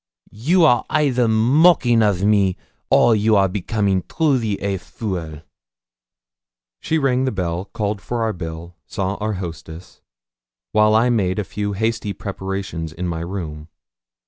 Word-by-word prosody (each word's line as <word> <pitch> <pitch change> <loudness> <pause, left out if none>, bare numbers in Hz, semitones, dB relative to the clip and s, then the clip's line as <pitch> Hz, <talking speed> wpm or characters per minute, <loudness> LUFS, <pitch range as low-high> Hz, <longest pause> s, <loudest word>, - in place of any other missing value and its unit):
'You 160 - +2
are 125 -6 +4
either 125 -5 +2
mocking 120 +2 +4
of 100 -3 +1
me, 100 -3 +2 0.3
or 115 - +5
you 110 +1 +2
are 100 -1 +4
becoming 100 0 -1
truly 125 -10 0
a 100 -1 -2
fool!' 85 -8 -6 1.4
She 160 - -1
rang 130 -3 +1
the 130 - 0
bell, 90 -2 -3
called 100 0 -3
for 120 +1 -3
our 110 -1 0
bill, 85 0 -7
saw 95 -2 -2
our 110 0 -2
hostess; 85 -1 -8 0.7
while 105 0 +4
I 120 +3 +3
made 95 -5 0
a 105 - 0
few 100 +1 -4
hasty 110 0 -2
prepartions 95 -4 -5
in 90 +2 -4
my 85 -1 -3
room. 80 -4 -6
100 Hz, 145 wpm, -20 LUFS, 90-115 Hz, 1.4 s, or